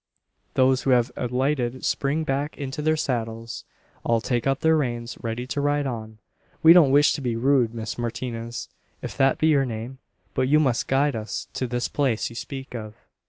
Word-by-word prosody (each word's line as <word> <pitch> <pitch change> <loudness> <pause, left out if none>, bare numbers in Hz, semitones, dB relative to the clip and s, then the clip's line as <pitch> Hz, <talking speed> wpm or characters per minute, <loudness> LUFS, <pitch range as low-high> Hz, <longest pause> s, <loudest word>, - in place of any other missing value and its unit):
Those 130 0 +4
who - - -1
have 125 -1 +3
alighted 125 0 -1
spring 145 +3 0
back 145 +1 -2
into 140 +1 -4
their 155 +1 +2
saddles. 115 -4 -3 0.4
All 115 -1 +2
take 120 +2 -1
up 135 0 +1
their 160 0 +4
reins, 120 -5 -2
ready 115 +2 -3
to 140 +3 -2
ride 145 0 +1
on. 110 -4 -5 0.5
"We 160 +1 +10
don't 170 -6 +7
wish 145 +2 +5
to - - -4
be 120 -3 -1
rude, 120 -1 +2
Miss 110 +1 -5
Martinez 120 0 -4 0.4
if - - -5
that 135 -1 +3
be - - +1
your 140 -3 +4
name; 120 +1 -5 0.3
but 130 0 +1
you 150 +3 +5
must 130 -6 +1
guide 140 0 +2
us 110 -1 -5
to 130 - -2
this 120 0 -1
place 130 -6 0
you - - -11
speak 135 +2 -7
of." 110 -3 -6
130 Hz, 190 wpm, -24 LUFS, 115-140 Hz, 0.5 s, We